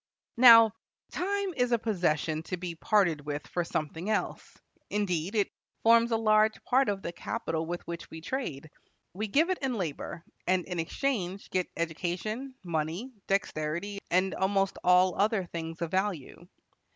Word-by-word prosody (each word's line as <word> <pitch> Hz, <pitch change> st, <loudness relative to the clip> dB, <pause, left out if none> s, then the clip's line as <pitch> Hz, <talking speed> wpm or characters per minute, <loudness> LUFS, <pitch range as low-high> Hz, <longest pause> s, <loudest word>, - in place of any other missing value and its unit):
Now, 230 Hz, -2 st, +9 dB, 0.4 s
time 395 Hz, +1 st, -1 dB
is 250 Hz, -1 st, +1 dB
a 235 Hz, -, +4 dB
possession 165 Hz, -8 st, 0 dB
to 180 Hz, -, -2 dB
be 175 Hz, -1 st, -5 dB
parted 170 Hz, -3 st, +2 dB
with 145 Hz, 0 st, -4 dB
for 175 Hz, -, -2 dB
something 165 Hz, +3 st, -3 dB
else; 215 Hz, -, -2 dB, 0.3 s
indeed, 190 Hz, -2 st, -1 dB
it 205 Hz, -2 st, +1 dB, 0.3 s
forms 230 Hz, +1 st, +6 dB
a 225 Hz, -, +2 dB
large 215 Hz, 0 st, +3 dB
part 265 Hz, 0 st, +3 dB
of 195 Hz, -1 st, -2 dB
the 170 Hz, -, -3 dB
capital 165 Hz, -1 st, -3 dB
with 175 Hz, +1 st, -4 dB
which 170 Hz, 0 st, -7 dB
we 160 Hz, -, -8 dB
trade. 160 Hz, -, -4 dB, 0.4 s
We 215 Hz, +4 st, -3 dB
give 310 Hz, -, +3 dB
it 370 Hz, -, -1 dB
and 265 Hz, -3 st, -1 dB
labor, 170 Hz, -1 st, -4 dB, 0.2 s
and 185 Hz, -1 st, +2 dB
in 180 Hz, -2 st, -4 dB
exchange 195 Hz, -, -2 dB
get 185 Hz, -1 st, 0 dB
education, 180 Hz, -, -3 dB
money, 170 Hz, +9 st, -3 dB
dexterity, 195 Hz, 0 st, -1 dB
and 185 Hz, +2 st, +2 dB
almost 195 Hz, 0 st, 0 dB
all 180 Hz, 0 st, +5 dB
other 210 Hz, -2 st, +2 dB
things 165 Hz, -1 st, -5 dB
of 170 Hz, -, -4 dB
value. 185 Hz, -3 st, -2 dB
185 Hz, 155 wpm, -29 LUFS, 170-220 Hz, 0.4 s, Now